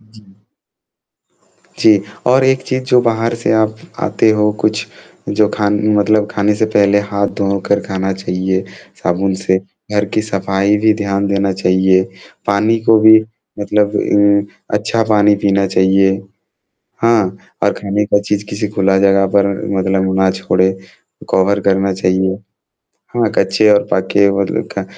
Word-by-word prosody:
जी। 110 0 -20 1.6
जी, 105 -3 +4 0.3
और 130 +1 +3
एक 130 0 +2
चीज़ 130 0 -3
जो 125 -1 +3
बाहर 115 0 0
से 115 - -1
आप 110 0 +1 0.2
आते 110 - +1
हो, 105 0 +2
कुछ 110 0 -1 0.4
जो 105 -1 +2
खान 105 -1 0 0.2
मतलब 105 0 +2
खाने 105 0 0
से 110 +1 0
पहले 100 0 +4
हाथ 100 -1 0
धो 100 0 0
कर 100 - +1
खाना 95 0 -2
चाहिए 95 0 -2 0.4
साबुन 95 +2 0
से, 95 0 0 0.3
घर 105 0 +1
की 110 - +1
सफाई 100 -1 0
भी 110 - +5
ध्यान 100 -2 -2
देना 100 0 0
चाहिए, 95 0 +2 0.4
पानी 105 +3 +1
को 110 -1 +5
भी 110 0 +7 0.4
मतलब 105 0 0 0.2
उम, 100 0 +3 0.3
अच्छा 115 +2 -1
पानी 105 -1 +4
पीना 100 0 +2
चाहिए। 95 +1 +2 0.9
हाँ, 110 -5 +2 0.3
और - - +2
खाने 100 +1 -2
का 100 - +2
चीज़ 105 0 -3
किसी 105 +1 -3
खुला 100 -2 +1
जगह 95 0 +3
पर 100 0 +4 0.3
मतलब 95 0 0
ना 95 0 +3
छोड़े, 95 0 0 0.6
कवर 100 +2 +2
करना 95 0 +1
चाहिए। 95 0 0 0.8
हाँ, 115 -2 +1
कच्चे 100 +3 +3
और 105 0 +2
पके 100 +2 +2
वो 100 0 0
ल - - -2
खा 100 - -3
100 Hz, 150 wpm, -15 LUFS, 95-105 Hz, 1.6 s, भी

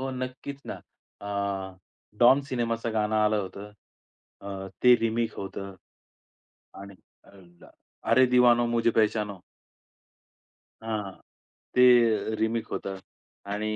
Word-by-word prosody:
हो 135 0 -3
नक्कीच 130 +2 -6
ना. - - -5 0.5
अ, 100 -2 -4 0.4
डॉन 125 +3 +6
सिनेमाचं 115 -2 -2
गाणं 110 0 0
आलं 105 0 +2
होतं. 100 +2 -9 0.7
अ, 95 -1 -7
ते 125 0 +8
रिमेक 115 0 -1
होतं 95 0 -7 1.1
आणि 100 0 -11 0.3
अ, - - -19
अ - - -22
ल्ला 85 -2 -18 0.4
अरे 130 +3 +6
दिवानो 120 -1 +4
मुझे 115 0 +1
पहचानो. 105 -3 0 1.4
हां, 105 -3 -3 0.6
ते 120 -3 +4
रीमिक्स 110 +1 -2
होतं 95 0 -4 0.6
आणि 110 +1 -2
110 Hz, 115 wpm, -27 LUFS, 100-120 Hz, 1.4 s, ते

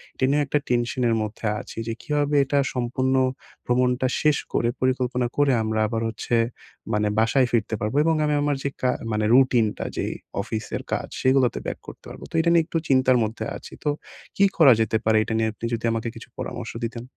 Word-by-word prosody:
এটা 130 - +1
নিয়েও 145 +1 +3
একটা 150 - +1
টেনশন 120 +1 0
এর 115 - +2
মধ্যে 110 +1 -6
আছি - - -10
যে 115 - -1
কীভাবে 145 -1 0
এটা 140 +1 +1
সম্পূর্ণ 130 +1 0 0.5
ভ্রমণটা 125 +1 +2
শেষ 150 -2 +3 0.2
করে 120 - +2
পরিকল্পনা 125 -1 +1
করে 145 -1 +4
আমরা 110 0 -1
আবার 115 +1 -2
হচ্ছে 115 +2 -2 0.6
মানে 105 0 +1
বাসায় 125 +3 +3
ফিরতে 110 -1 +1
পারবো? 105 +5 -2
এবং 165 0 +3
আমি 150 - +1
আমার 145 0 +1
যে 140 - 0
কা 125 - +3 0.2
মানে 105 0 0
রুটিনটা 125 -4 +3
যেই - - -1 0.3
অফিসের 110 +2 -4
কাজ - - -2
সেগুলাতে 130 -1 +3
ব্যাক - - -4
করতে - - -11
পারবো। - - -10
তো - - -7
এইটা 165 +1 +3
নিয়ে 170 -1 +5
একটু 165 - -2
চিন্তার 130 -1 +4
মধ্যে 110 0 -3
আছি - - -12
তো, 150 - +1 0.5
কী 200 - +5
করা 140 -6 +8
যেতে 110 0 +1
পারে? 110 0 +4
এইটা 110 - -4
নিয়ে 110 0 +1
আপনি 110 - -7
যদি 115 0 -2
আমাকে 115 0 -2
কিছু 115 0 -10
পরামর্শ 120 -2 -5
দিতেন। 115 0 -6
125 Hz, 200 wpm, -24 LUFS, 115-135 Hz, 0.6 s, করা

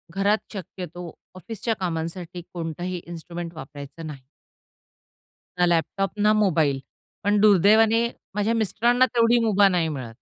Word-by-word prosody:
घरात 200 +2 +3 0.2
शक्यतो 180 -2 -7 0.2
ऑफिसच्या 225 +4 -3
कामांसाठी 175 0 -4
कोणताही 175 +1 -4
इन्स्ट्रुमेंट 170 0 -7
वापरायचं 145 +2 -9
नाही. 140 -4 -9 1.4
ना 180 - +5
लॅपटॉप, 175 +3 0
ना 210 +1 +4
मोबाईल. 160 -10 +2 0.4
पण 205 +1 +2
दुर्दैवाने 215 +3 +5 0.3
माझ्या 210 +2 +1
मिस्टरांना 235 +3 +2
तेवढी 235 +1 +4
मुभा 205 -2 +5
नाही 175 -4 +1
मिळत. 130 -6 -6
180 Hz, 115 wpm, -24 LUFS, 165-210 Hz, 1.4 s, ना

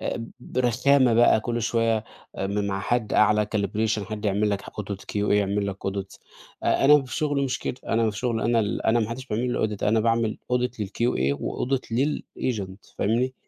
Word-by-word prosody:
آآ، 115 - -3
برخامة 125 +1 +2
بقى، 120 -2 +5
كل 120 0 -2
شوية، 115 -1 +1 0.3
آآ، 95 - -2
م 100 +1 -1
مع 95 -1 -2
حد 115 +1 -1
أعلى 105 0 +4
calibration، 105 +2 0
حد 110 0 -6
يعمل 105 +1 +1
لك 100 -1 -2
audit 100 -2 -6
QA، - - -5 0.2
يعمل 100 0 +1
لك 100 -1 -4
audit 95 0 -4 0.4
آآ، - - +2
أنا 150 0 +7
في 130 - -6
شغلي 145 -3 0
مش 130 -1 -2
كده. - - -4
أنا 115 -1 +2
في 105 - -9
شغلي، 115 -2 -1
أنا 115 -1 +3
ال 105 0 -2
أنا 115 +1 +4
ما 110 - -1
حدّش 130 +3 -6
بيعمل 120 +3 -1
لي 110 - +1
الaudit. - - -12
أنا 110 +2 +3
باعمل 115 -1 +1
audit 125 -1 0
لل 105 - -2
QA 70 - 0
وaudit 130 +1 -1
للagent، 115 -7 -3
فاهمني؟ 125 +5 +1
110 Hz, 195 wpm, -25 LUFS, 105-125 Hz, 0.4 s, أنا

